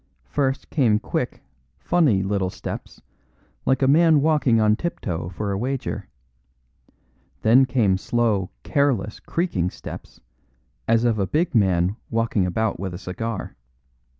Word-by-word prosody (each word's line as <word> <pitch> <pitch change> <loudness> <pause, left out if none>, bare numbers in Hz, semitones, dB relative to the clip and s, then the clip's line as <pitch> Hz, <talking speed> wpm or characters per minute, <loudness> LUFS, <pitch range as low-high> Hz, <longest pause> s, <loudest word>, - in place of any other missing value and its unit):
First 135 -2 -2
came 120 -8 +3
quick, - - -3 0.3
funny 105 - +2
little 100 -1 0
steps, - - -8 0.6
like 130 +1 +2
a - - +4
man 160 +2 +5
walking 140 -6 +3
on 105 -1 +4
tiptoe 90 - -4
for 100 +3 -4
a 100 - -1
wager; 130 +3 -3 1.4
then 125 +4 +6
came 105 -7 +2
slow, 110 -5 0
careless, 130 -8 0
creaking 130 - -1
steps, - - -10 0.7
as 115 0 +3
of 115 -3 +1
a 95 - 0
big 165 - 0
man 95 -2 +2
walking 115 -4 +1
about 110 +4 -1
with 95 -2 -4
a - - -5
cigar. 100 +3 -5
110 Hz, 130 wpm, -23 LUFS, 95-135 Hz, 1.4 s, then